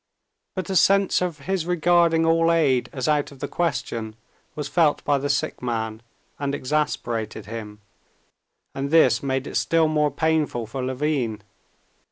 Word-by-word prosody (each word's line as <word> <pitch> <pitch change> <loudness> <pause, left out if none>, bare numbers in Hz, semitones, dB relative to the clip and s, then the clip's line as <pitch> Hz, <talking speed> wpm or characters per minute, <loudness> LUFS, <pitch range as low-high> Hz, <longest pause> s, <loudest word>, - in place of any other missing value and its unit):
But 185 +1 -4
a - - -1
sense 195 +2 +4
of 170 -5 -3
his 180 +1 -2
regarding 170 -1 +3
all 165 0 +3
aid 140 -7 +2
as 130 0 -3
out 150 -2 +1
of 140 - -13
the - - -4
question 115 -10 -2 0.4
was 150 -2 -4
felt 155 -1 +2
by 145 -1 +2
the 145 +1 -3
sick 140 - -1
man, 110 -2 -3 0.4
and 140 0 -1
exasperated 125 -7 -2
him. 105 -1 -8 0.9
And 135 +1 -3
this 165 +1 +4
made 135 -1 -1
it - - -3
still 165 -1 +2
more 150 -1 +2
painful 150 -5 0
for 130 +4 -5
Levin. 130 -5 -2
145 Hz, 155 wpm, -23 LUFS, 125-165 Hz, 0.9 s, sense